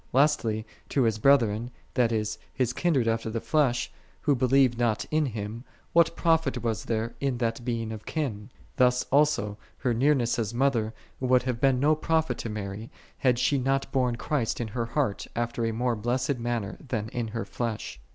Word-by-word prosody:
'* - - -34
Lastly, 120 -6 +2 0.2
to 135 - +2
His 110 -2 +1
brethren, 115 -3 +3 0.2
that 120 -2 +2
is, 105 -2 -1
His 125 -2 0
kindred 140 -9 +1
after 115 0 0
the 115 +1 -2
flesh, 130 -3 +1 0.3
who 145 - +3
believed 130 -1 +3
not 115 -3 +1
in 155 -1 +2
Him, 110 0 -5 0.3
what 170 0 +4
profit 160 -7 +1
was 110 -4 -1
there 115 0 -1
in 135 -3 0
that 115 0 -1
being 115 -2 -2
of 110 -1 -8
kin? 125 -9 -3 0.3
Thus 125 0 +4
also 140 -8 +2 0.2
her 125 - 0
nearness 125 -1 +2
as 110 0 -2
a - - -5
Mother 120 -5 +1 0.2
would 125 -1 +3
have 125 -2 -2
been 135 -1 +4
of 125 - -2
no 150 +2 +5
profit 160 +1 0
to 115 - -4
Mary, 105 +1 -5 0.3
had 125 -2 +3
she 125 +3 +2
not 135 +1 0
borne 125 -3 +1
Christ 125 -1 -1
in 115 -2 -3
her 115 +1 -2
heart 115 -4 -1
after 120 0 -1
a - - 0
more 120 +2 0
blessed 125 +4 -1
manner 115 -4 -3
than 110 -6 -3
in 120 -1 -3
her 115 +1 -4
flesh. 115 - -4
120 Hz, 190 wpm, -27 LUFS, 115-135 Hz, 0.3 s, no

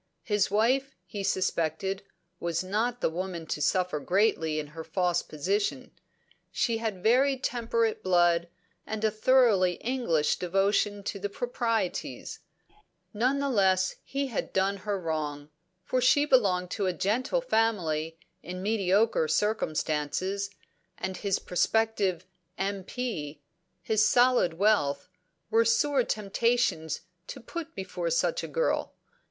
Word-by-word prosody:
His 205 -3 +1
wife, 260 +6 +1
he 200 -2 -6
suspected, 185 +1 -1 0.4
was 170 0 -1
not 225 +6 -1
the - - +2
woman 175 -1 -4
to 150 - -3
suffer 180 -2 +1
greatly 165 -3 +1
in 155 - -2
her 160 0 -6
false 175 0 0
position; 195 +8 -2 0.6
she 230 -2 0
had 215 -5 -4
very 265 +4 +4
temperate 230 -3 -1
blood, 175 -2 +3 0.4
and 220 0 -4
a 220 - +3
thoroughly 215 -5 +4
English 175 - 0
devotion 200 +3 +1
to 200 - -4
the 205 +1 -3
proprieties; 230 -3 -2 0.7
none 250 +6 +1
the 280 0 0
less 190 -4 +2
he 275 +1 -2
had 245 -6 -4
done 195 +1 +1
her 200 0 -3
wrong, 150 -3 -4 0.3
for 255 +6 0
she 285 +4 +4
belonged 190 -10 +2
to 200 -3 -1
a 185 - +1
gentle 230 - 0
family 175 - 0 0.2
in 180 +1 -7
mediocre 205 -3 +2
circumstances, 185 +1 -1 0.5
and 190 - -4
his 200 -2 0
prospective 195 -1 0 0.3
"M.P.," 195 - -4 0.4
his 215 -1 +2
solid 245 -7 +4
wealth, 165 -7 +1 0.4
were 225 +1 +5
sore 260 +4 +2
temptations 210 -7 0 0.3
to 270 - -7
put 330 +7 -7
before 190 - -3
such - - +1
a - - -4
girl. - - -1
200 Hz, 125 wpm, -28 LUFS, 180-230 Hz, 0.7 s, were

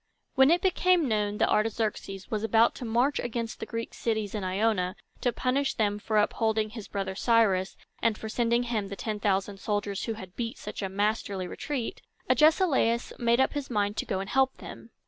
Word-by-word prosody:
When 265 +1 +6
it 340 +2 +3
became 365 -3 +3
known 210 -2 0
that - - +2
Artaxerxes 210 -3 -1
was 215 -1 -1
about 225 +1 +4
to 250 - -7
march 240 +5 +1
against 235 -1 -3
the 220 - -5
Greek 230 +1 -5
cities 220 -3 -2
in 210 -3 -3
Ionia, 185 -1 0 0.2
to 245 - +1
punish 270 +3 0
them 205 -2 0
for 215 +1 -1
upholding 220 0 +1
his 220 -3 -8
brother 195 -1 -3
Cyrus, 200 -3 +2 0.2
and 225 -2 +2
for 220 - -6
sending 235 +1 +1
him 225 -4 -2
the 200 - -6
ten 215 +1 -4
thousand 195 0 0
soldiers 205 -1 -2
who 225 - -2
had 190 -4 -10
beat 235 +3 -4
such - - -7
a 195 - -2
masterly 200 -1 -1
retreat, 255 +5 -4 0.3
Agesilaus 265 -3 +3
made 235 0 +3
up 265 - +3
his 285 -2 -4
mind 205 -3 0
to - - -1
go 190 - -1
and 195 +1 -5
help 265 +1 +2
them. - - -10
220 Hz, 195 wpm, -28 LUFS, 205-240 Hz, 0.3 s, When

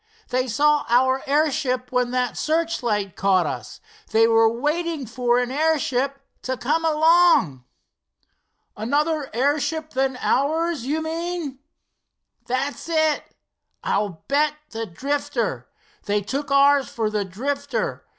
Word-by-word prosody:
They 255 +1 0
saw 295 +5 +2
our 260 +2 +3
airship 275 -4 0
when 250 -1 +1
that 250 -1 -1
searchlight 245 - -1
caught 190 -2 +2
us. - - -6 0.3
They 225 +1 +4
were 225 0 +4
waiting 300 +4 -2
for 245 +1 0
an 245 0 0
airship 275 -3 0 0.2
to 260 0 -3
come 305 +7 0
along." 320 - +4 1.1
"Another 290 +6 0
airship 290 +5 0
than 265 -1 0
ours, 315 -1 0
you 315 +3 -1
mean?" 325 -3 -4 0.9
"That's 275 +6 -3
it, 330 - -1
and 315 -1 +2 0.6
I'll 200 -6 -1
bet 295 +2 +2 0.2
the 225 0 -4
Drifter! 280 +11 -3 0.4
They 205 0 +1
took 275 +8 -4
ours 280 -1 +4
for 220 -2 -2
the 210 -1 0
Drifter. 280 +9 -3
275 Hz, 120 wpm, -23 LUFS, 240-305 Hz, 1.1 s, They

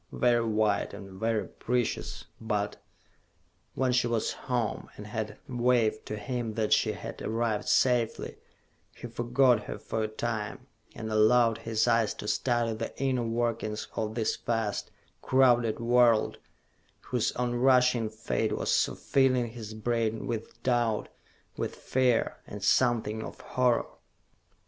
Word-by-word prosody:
Very 120 -1 +2
white, 105 -2 +1
and 95 -2 -10
very 110 0 0
precious, 125 -1 -2 0.2
but.... 105 -2 -2 1.0
When 130 0 +1
she 125 -1 +2
was 115 -2 0
home, 120 -4 -2
and 105 - -8
had 105 0 -4
waved 120 -3 +1
to 105 - -3
him 115 +1 -3
that 110 -2 +2
she - - +2
had - - -8
arrived 115 -1 -1
safely, 120 -3 +1 0.6
he - - -9
forgot 120 -1 +2
her - - -5
for 110 - -3
a 110 - 0
time, 110 -1 -4 0.3
and 110 0 -5
allowed 115 +1 +4
his 115 0 0
eyes 115 -2 +2
to 105 - -7
study 120 -1 +1
the 110 +1 -6
inner 130 -2 +1
workings 115 -2 -2
of 110 -1 -2
this 110 -2 0
vast, 115 -3 -2 0.3
crowded 120 -4 +3
world 120 -1 +3 0.6
whose 125 -3 -1
on 125 0 -1
rushing 125 -2 +3
fate 110 0 -2
was - - -1
so - - +2
filling 130 -3 +2
his 110 -2 -8
brain 115 0 -1
with 115 0 -5
doubt, 120 -4 +1 0.5
with - - -3
fear 125 -2 +1
and 100 -1 -8
something 110 -1 +2
of - - -8
horror! 125 -2 +1
115 Hz, 140 wpm, -29 LUFS, 110-120 Hz, 1.0 s, allowed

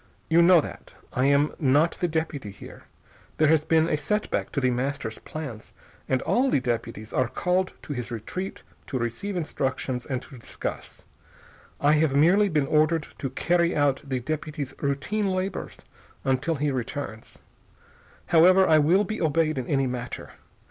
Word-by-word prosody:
You 170 +1 +6
know 170 -1 +7
that. - - -10 0.2
I 130 - +1
am 140 +2 +3
not 145 +3 +3
the 175 - +2
deputy 160 -8 -3
here. 100 - -12 0.5
There 155 -1 +4
has 160 -1 +4
been 160 0 +3
a - - +1
set 210 +7 -1
back - - -1
to 140 - 0
The 130 -2 +2
Master's 125 -2 -3
plans 140 -9 -8 0.4
and 130 -1 +1
all 265 +2 +2
the 140 - +3
deputies 115 -3 -4
are 130 - +2
called 180 +8 0
to 145 - -5
his 125 -3 -5
retreat 120 - -5 0.2
to 135 - -2
receive 120 - -3
instructions 130 -5 -2
and 130 -2 -1
to 130 -2 -12
discuss. - - -7 0.7
I 145 - +4
have 150 -4 +2
merely 185 +8 +5
been 150 -5 +1
ordered 155 +2 +2
to 135 - -2
carry 170 +6 +1
out 145 -2 +2
the 135 -3 -2
deputy's 150 +1 -4
routine 170 +9 -1
labors 185 +1 -3 0.5
until 135 +5 +1
he 145 0 0
returns. 130 -3 -5 0.9
However, 185 +3 +6
I 155 -1 +6
will 175 +7 +4
be 215 +2 -4
obeyed 155 -2 +1
in 125 - -5
any 135 -2 +1
matter. 125 -1 -5
145 Hz, 165 wpm, -26 LUFS, 130-170 Hz, 0.9 s, know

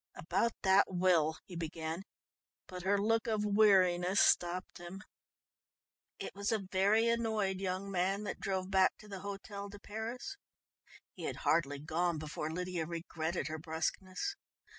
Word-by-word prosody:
"About 195 +8 0
that 190 0 +6
will 175 -4 +3
" - - -63
he 180 - -10
began, 165 +1 -3 0.6
but 180 -1 -7
her 195 +3 +2
look 225 +3 +2
of 215 -2 +1
weariness 195 -3 +4
stopped 175 +1 +2
him. 175 +4 -8 1.1
It - - -6
was 200 +2 -1
a 215 -3 0
very 205 +4 +4
annoyed 220 -5 +1
young 190 +1 -2
man 190 +2 +1
that 205 - -4
drove 190 -1 -2
back 190 -1 +4
to 215 - -14
the 195 -2 -6
Hôtel 200 0 -6
de 205 - -10
Paris. 230 - -5 0.8
He - - -7
had - - -2
hardly 145 -3 +2
gone 160 +3 0
before 155 0 -4
Lydia 180 -1 -2
regretted 165 0 -3
her 160 0 -4
brusqueness. 185 - -2
190 Hz, 150 wpm, -34 LUFS, 175-205 Hz, 1.1 s, that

